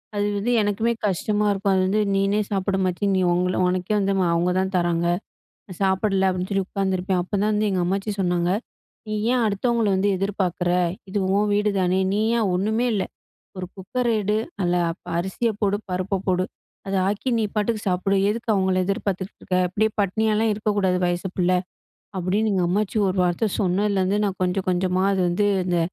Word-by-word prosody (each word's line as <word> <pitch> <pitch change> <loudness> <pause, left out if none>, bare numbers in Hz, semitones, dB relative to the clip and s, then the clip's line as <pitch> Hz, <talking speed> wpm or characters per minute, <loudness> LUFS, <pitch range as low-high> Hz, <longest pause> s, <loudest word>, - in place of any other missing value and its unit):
அது 205 - +1
வந்து 220 +5 -1
எனக்குமே 210 +3 +1
கஷ்டமா 205 +3 0
இருக்கும், 195 0 0
அது 185 - +2
வந்து 210 +3 +2
நீனே 195 +2 +2
சாப்பிடு 195 0 0
அம்மாச்சி 185 +1 -1
நீ 185 - +2
உங்கள 180 +1 0
உனக்கே 185 +3 -1
வந்து 195 0 +1 0.2
அவங்க 170 +2 +1
தான் 190 +1 -1
தராங்க. 170 -1 +1 0.6
நான் 185 -3 -11
சாப்பிடல 190 0 +2
அப்டின்னு 185 0 -3
சொல்லி 195 -1 0
உக்காந்துருப்பேன் 190 -1 -1
அப்பதான் 205 +3 0
வந்து 210 0 +1
எங்க 185 -2 0
அம்மாச்சி 195 +4 -1
சொன்னாங்க, 175 -1 +1 0.6
"நீ 215 - -5 0.2
ஏன் 250 -1 +2
அடுத்தவங்கள 225 +2 +1
வந்து 195 +2 +1
எதிர்பார்க்குற 190 -3 -1 0.4
இது 205 +2 -2 0.2
உன் 205 0 +2
வீடுதானே 195 -3 +1
நீ 205 - +1 0.2
ஏன் 220 -3 +1
ஒன்னுமே 220 +6 +1
இல்ல, 200 - 0 0.5
ஒரு 185 - -4
குக்கர 240 +6 -3
எடு 210 +1 0 0.3
நல்ல 175 -2 +1 0.3
ப - - -40
அரிசிய 190 +6 -1
போடு, 205 -1 +2
பருப்ப 185 +2 -2
போடு, 185 -1 +2 0.4
அத 195 - -3
ஆக்கி 210 +6 -1
நீ 220 - +1
பாட்டுக்கு 215 +1 0
சாப்பிடு. 185 +2 +1
எதுக்கு 230 +1 -3
அவங்கள 190 -1 +2
எதிர்பாத்துட்டு 195 0 -2
இருக்க, 185 - -4
அப்டியே 215 +4 +1
பட்னியாலாம் 215 +2 +1
இருக்கக்கூடாது 205 -3 0
வயசு 175 +2 -1
பிள்ள. 180 0 +2 0.7
அப்டின்னு 200 +5 0
"எங்க 185 -2 +1
அம்மாச்சி 210 +3 0
ஒரு 185 - -2
வார்த்த 180 +5 0
சொன்னலந்து, 195 +1 +1
நான் 195 -2 -3
கொஞ்சம் 185 +1 -1
கொஞ்சமா 185 +1 +1
அது 190 - 0
வந்து 180 +4 +1 0.2
இந்த 175 -1 +1
195 Hz, 170 wpm, -23 LUFS, 185-210 Hz, 0.7 s, அது